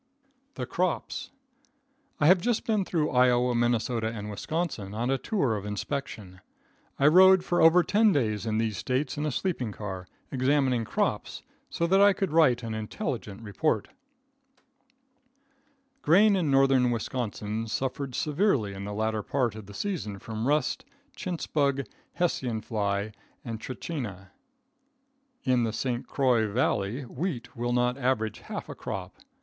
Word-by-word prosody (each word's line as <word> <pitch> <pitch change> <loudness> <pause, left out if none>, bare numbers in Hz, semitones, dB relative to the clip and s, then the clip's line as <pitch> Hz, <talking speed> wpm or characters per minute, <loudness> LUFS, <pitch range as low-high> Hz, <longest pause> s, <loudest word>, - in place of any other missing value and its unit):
The - - -3
Crops. - - -2 0.9
I 145 - +3
have 180 +3 +6
just 235 +1 0
been 215 -3 +1
through 155 -4 0
Iowa, 125 0 +3
Minnesota 120 -1 +1
and 105 -2 -5
Wisconsin, 115 - -3
on 120 +4 -1
a 135 - +1
tour 140 - 0
of 100 - -4
inspection. 105 -3 -5 0.6
I 140 - +2
rode 190 +4 +7
for 175 -1 +1
over 165 +2 +7
ten 210 +3 +4
days 115 - 0
in 110 0 0
these 110 -2 -1
States 130 +2 -1
in 150 +1 -2
a - - -1
sleeping 130 - -2
car, 95 -3 -6 0.2
examining 130 -2 +2
crops, - - -2 0.3
so 170 - -1
that 190 +3 +4
I 200 0 +7
could 190 -3 -2
write 150 -7 +4
an 115 -1 -4
intelligent 110 -1 -4
report. 110 +9 -1 2.1
Grain 200 +4 +5
in 175 -6 0
Northern 135 -2 +4
Wisconsin 115 -2 -3
suffered 135 +2 -3
severely 150 - +1
in 100 0 -6
the 105 0 -5
latter 110 0 -1
part 125 +1 0
of 110 -2 -10
the 100 - -11
season 165 - -3
from 110 +4 -4
rust, 150 +2 +1 0.3
chintz 175 -7 -4
bug, 140 -2 +1 0.3
Hessian 130 -10 -1
fly 100 -1 -2 0.3
and 115 -2 -4
trichina. 115 - -6 1.1
In 130 -2 +2
the 115 - 0
St. 120 +2 -3
Croix 125 -5 +2
valley 120 +1 0
wheat 125 -1 -5
will 120 +1 -2
not 125 +2 +1
average 125 -5 0
a - - -19
half - - -5
crop. - - -5
125 Hz, 145 wpm, -28 LUFS, 110-150 Hz, 2.1 s, rode